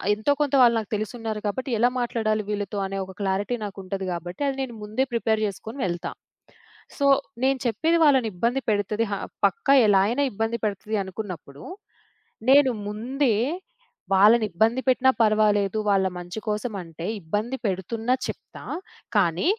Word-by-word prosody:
ఎంతో 220 +7 0
కొంత 290 -1 0
వాళ్ళు 235 -1 +6
నాకు 215 - -8
తెలిసున్నారు 220 0 -4
కాబట్టి, 260 +6 -3
ఎలా 245 +1 +5
మాట్లాడాలి 215 -3 0
వీళ్ళతో 205 0 -3
అనే 195 0 -4
ఒక 190 - -11
క్లారిటీ 200 +5 0
నాకుంటది 195 -1 -5
గాబట్టి, 175 - -7
అది 270 - -4
నేను 240 -3 -6
ముందే 225 +6 0
ప్రిపేర్ 220 -2 +1
జేసుకొని 220 +6 -7
వెళ్తా. 175 0 -3 0.9
సో, 280 - +1 0.4
నేను 265 0 +2
చెప్పేది 320 +8 +2
వాళ్ళనిబ్బంది 245 -2 +2
పెడతది, 210 +2 0
హా 200 - -1 0.3
పక్కా 285 -12 +2
ఎలా 195 -2 +5
అయినా 265 +5 +1
ఇబ్బంది 225 +3 -1
పెడతది 210 +1 -2
అనుకున్నప్పుడూ, 180 -8 -8 0.9
నేను 275 -2 +6 0.2
ముందే 240 +3 0 0.8
వాళ్ళనిబ్బంది 220 +3 +4
పెట్టినా 260 +1 +4
పరవాలేదు, 215 -1 +3
వాళ్ళ 195 -2 +3
మంచి 175 +4 -6
కోసమంటే 195 -7 -4
ఇబ్బంది 210 +9 -2
పెడుతున్నా 220 +6 -1
చెప్తా, - - -8 0.5
కానీ 175 - +2
215 Hz, 135 wpm, -25 LUFS, 195-240 Hz, 0.9 s, వాళ్ళు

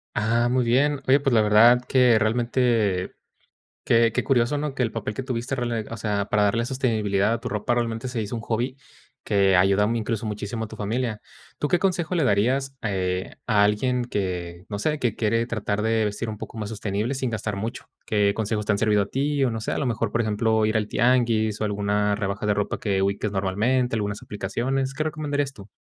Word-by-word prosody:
Ah, 115 +3 +2
muy 125 +1 +2
bien. 135 +4 +2
Oye, 135 +2 +5
pues, 135 -2 0
la 110 - +5
verdad 115 +4 +6
que, 125 -4 +5
realmente, 115 -4 +1 0.7
que 115 0 +4
que - - -1
curioso, 130 +1 +2
¿no? 145 -1 -3
Que 130 - 0
el 115 - -1
papel 105 -2 -4
que 130 - -4
tuviste, 125 0 -3
rela 120 -3 -2
o 115 - -5
sea, 105 -3 -1
para 105 0 +1
darle 115 +3 +1
sostenibilidad 110 -6 0
a 115 - 0
tu - - -6
ropa, 105 +3 -1
realmente, 115 +1 -2
se 120 -2 -3
hizo 105 +2 -4
un 115 - -4
hobby 120 +4 -2 0.5
que 100 -2 +3
ayuda, 95 +3 +4
mm, 115 - 0
incluso 115 -1 -2
muchísimo 105 +1 -4
a - - -9
tu 110 - -10
familia. 110 +1 -2 0.4
¿Tú 150 - -1
qué 175 - +3
consejo 180 -2 0
le 160 -5 +2
darías, 130 +6 +1
eh, 95 -3 -2
a 105 -3 +4
alguien 125 +5 +1
que, 90 -6 -4
no 100 -1 -5
sé, 150 +6 -1
que 120 -5 0
quiere 115 +1 +1
tratar 105 -3 -2
de 110 0 +1
vestir 105 +2 -2
un 110 -1 -5
poco 115 - -9
más 105 -2 -4
sostenible 105 +2 -2
sin 130 -2 -2
gastar 110 -2 -3
mucho? 115 +6 -5 0.2
¿Qué 105 -1 +2
consejos 105 0 -2
te 105 - +2
han - - 0
servido 105 -1 +2
a - - -6
ti? 140 +5 0
O - - +1
no 110 -1 -4
sé, - - -3
a - - -1
lo 145 - -1
mejor, 115 -3 -1
por 120 - 0
ejemplo, 110 0 +1
ir 110 +1 0
al 105 -1 0
tianguis 115 -4 +2
o - - +1
alguna 105 0 0
rebaja 100 0 -3
de 105 - +2
ropa 105 0 -2
que 100 -3 0
ubiques 100 +2 -1
normalmente, 110 +6 0
algunas 105 -1 -3
aplicaciones. 130 +7 -2
¿Qué 155 +3 -2
recomendarías 145 -3 -2
tú? 105 -5 -13
110 Hz, 220 wpm, -24 LUFS, 105-125 Hz, 0.7 s, verdad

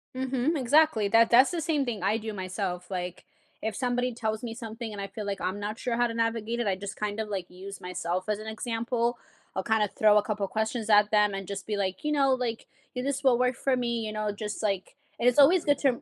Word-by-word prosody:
Mhm, 260 +4 0
exactly. 275 -4 +4
That 225 +2 +5
that's 255 +6 +6
the 340 - -2
same 305 -3 0
thing 220 -6 -4
I 210 +3 +2
do 220 -1 -5
myself, 185 -1 -4
like, 180 -1 -4 0.4
if 220 -2 -2
somebody 245 +1 0
tells 220 -1 -3
me 230 -1 -4
something 225 -1 -6
and 205 - -7
I 195 - -3
feel 210 +1 -7
like 200 -1 -3
I'm 185 +3 -2
not 210 +2 -4
sure 240 -2 -1
how 240 0 +2
to 230 - -5
navigate 230 0 -1
it, 230 - 0
I 190 - +2
just 200 +1 -7
kind 210 0 -3
of, 215 -1 -3
like, 190 -3 -4
use 190 +1 -9
myself 180 +1 -3
as 210 -1 -1
an 215 - -8
example. 235 +2 -1 0.4
I'll 190 - -1
kind 220 +1 +2
of 205 - -2
throw 210 -1 +5
a 210 - +4
couple 205 -2 -2
questions 220 +2 -2
at 210 0 +5
them 210 -1 +4
and 195 -1 -5
just 200 0 -6
be 210 - -1
like, 190 -2 -2
"You 300 - 0
know, 275 -2 +3
like, 245 -3 -3 0.3
this 275 +2 -2
will 250 -3 +5
work 250 0 +1
for 265 0 +1
me," 235 -2 -1
you 215 - -3
know, 215 -1 -2
just, 210 +1 -5
like 195 +1 -1 0.2
and 245 - +5
it's 250 - -2
always 320 +5 +6
good 290 -2 +3
to 275 -1 +1
220 Hz, 250 wpm, -28 LUFS, 205-245 Hz, 0.4 s, that's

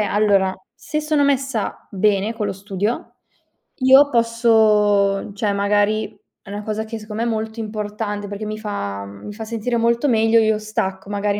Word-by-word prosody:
allora, 200 -2 +2 0.2
se 305 - -4
sono 305 -1 +1
messa 270 -5 -1
bene 205 +2 +1
con 210 -2 -2
lo - - -2
studio, 200 +3 -3 0.6
io 270 +2 +6
posso 215 -4 +3
cioè, 205 0 -1
magari 205 +1 +1 0.2
è - - -15
una 205 +1 -5
cosa 215 0 -2
che 225 0 -6
secondo 210 0 -8
me 230 - -1
è - - 0
molto 220 0 -3
importante, 210 -1 -4
perché 205 +1 -6
mi 215 0 -4
fa 100 - -4
mhmm, 100 0 -11
mi 205 - -7
fa 220 +1 -7
sentire 235 +1 -2
molto 235 +4 +2
meglio. 225 -1 +4
Io 220 -1 +2
stacco, 205 -3 -3
magari 205 0 -1
215 Hz, 175 wpm, -20 LUFS, 205-230 Hz, 0.6 s, io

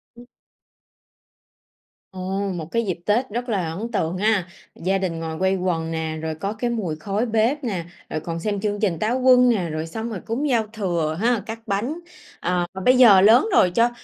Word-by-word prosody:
Ừm. 240 +1 -13 1.9
Ồ, 190 +1 -3
một 165 -2 -5
cái 230 0 0
dịp 180 -4 -3
Tết 235 +5 +1
rất 240 +4 -4
là 190 -7 -1
ấn 225 +7 -5
tượng 165 -2 -1
ha! 205 -2 +1 0.3
Gia 190 +3 0
đình 180 -4 -2
ngồi 160 -1 -5
quây 190 +1 +2
quần 170 -3 -1
nè, 160 -1 -3
rồi 160 0 -3
có 195 +6 -3
cái 240 +2 -2
mùi 205 -10 -2
khói 200 +8 -2
bếp 230 +6 +1
nè, 190 -9 -3 0.2
rồi 155 - -2
còn 165 +1 -5
xem 205 +3 -2
chương 205 0 -1
trình 190 -7 0
Táo 240 +4 0
Quân 250 -1 +6
nè, 190 -8 +1
rồi 155 +1 -4
xong 220 +7 -5
rồi 215 -5 -5
cúng 270 +6 -1
giao 230 -4 +1
thừa 170 -7 -1
ha, 235 -1 +2
cắt 225 0 -6
bánh. 235 +12 -2 0.4
À, 180 0 0 0.2
bây 255 0 +5
giờ 215 -7 +8
lớn 225 - +6
rồi 180 - +5
cho 235 +1 +4
200 Hz, 200 wpm, -22 LUFS, 170-230 Hz, 1.9 s, giờ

